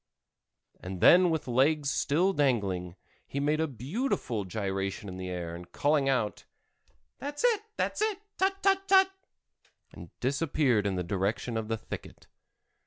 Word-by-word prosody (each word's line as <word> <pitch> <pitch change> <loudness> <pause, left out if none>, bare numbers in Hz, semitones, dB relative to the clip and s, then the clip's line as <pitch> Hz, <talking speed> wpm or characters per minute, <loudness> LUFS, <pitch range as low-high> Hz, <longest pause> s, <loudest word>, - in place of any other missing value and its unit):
and 90 0 -6
then 180 - +7
with 160 -4 -2
legs 140 +3 +2
still 175 +7 +2
dangling, 100 - 0 0.3
he 140 - -3
made 150 +2 +1
a 160 - +1
beautiful 130 - -2
gyration 95 0 -3
in 90 -1 -7
the 95 0 -5
air, 85 -2 -4
and 85 +1 -10
calling 145 -1 +2
out: 115 -6 0 0.8
"That's 290 - -5
it—that's 435 -3 0
it—tut—tut—tut!" 390 -2 +2 1.1
disappeared 135 -5 +1
in 95 - -1
the 90 - -1
direction 100 +6 -2
of 110 -1 -2
the 115 0 -1
thicket. - - -9
135 Hz, 125 wpm, -29 LUFS, -, 1.1 s, then